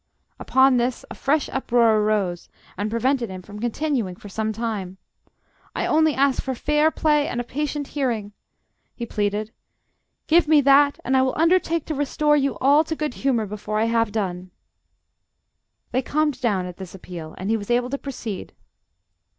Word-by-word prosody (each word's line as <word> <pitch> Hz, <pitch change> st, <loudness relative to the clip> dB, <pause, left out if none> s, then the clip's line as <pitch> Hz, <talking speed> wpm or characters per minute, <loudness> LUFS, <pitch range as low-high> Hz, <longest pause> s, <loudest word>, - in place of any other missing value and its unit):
Upon 265 Hz, 0 st, +4 dB
this 245 Hz, +2 st, -1 dB
a -, -, -4 dB
fresh 290 Hz, +1 st, 0 dB
uproar 235 Hz, -4 st, +2 dB
arose, 205 Hz, -5 st, -1 dB, 0.3 s
and 205 Hz, +2 st, -2 dB
prevented 235 Hz, +1 st, 0 dB
him 185 Hz, -1 st, -8 dB
from 205 Hz, +2 st, -10 dB
continuing 240 Hz, -4 st, -1 dB
for 205 Hz, -, -12 dB
some 220 Hz, +2 st, -2 dB
time. 210 Hz, -4 st, -4 dB, 0.8 s
"I -, -, -1 dB
only 315 Hz, -1 st, +3 dB
ask 275 Hz, 0 st, +2 dB
for 265 Hz, -1 st, -3 dB
fair 300 Hz, +4 st, +2 dB
play 300 Hz, -2 st, +1 dB
and 245 Hz, -, -3 dB
a -, -, -1 dB
patient 290 Hz, +2 st, -3 dB
hearing!" 235 Hz, -8 st, -2 dB, 0.6 s
he 235 Hz, -, -5 dB
pleaded. 210 Hz, 0 st, -2 dB, 0.7 s
"Give 335 Hz, 0 st, +4 dB
me 305 Hz, -1 st, +6 dB
that, 280 Hz, +1 st, +5 dB
and 265 Hz, -, +1 dB
I 260 Hz, -, +5 dB
will 260 Hz, 0 st, 0 dB
undertake 335 Hz, -1 st, +2 dB
to 315 Hz, -, -3 dB
restore 295 Hz, +1 st, +1 dB
you 275 Hz, -1 st, 0 dB
all 285 Hz, +4 st, +4 dB
to 320 Hz, -, -3 dB
good 300 Hz, -4 st, -3 dB
humour 245 Hz, -5 st, 0 dB
before 210 Hz, +1 st, -4 dB
I 220 Hz, -, +2 dB
have 230 Hz, -1 st, +1 dB
done." 185 Hz, -4 st, -3 dB, 1.4 s
They 255 Hz, -, +1 dB
calmed 300 Hz, +1 st, -1 dB
down 200 Hz, -7 st, +1 dB
at 180 Hz, -1 st, -8 dB
this 190 Hz, -1 st, -9 dB
appeal, 170 Hz, -4 st, -9 dB
and 190 Hz, +4 st, -3 dB
he -, -, +3 dB
was 205 Hz, 0 st, -8 dB
able 245 Hz, +1 st, +1 dB
to 280 Hz, -, -2 dB
proceed. 235 Hz, -8 st, -6 dB
245 Hz, 175 wpm, -23 LUFS, 210-285 Hz, 1.4 s, me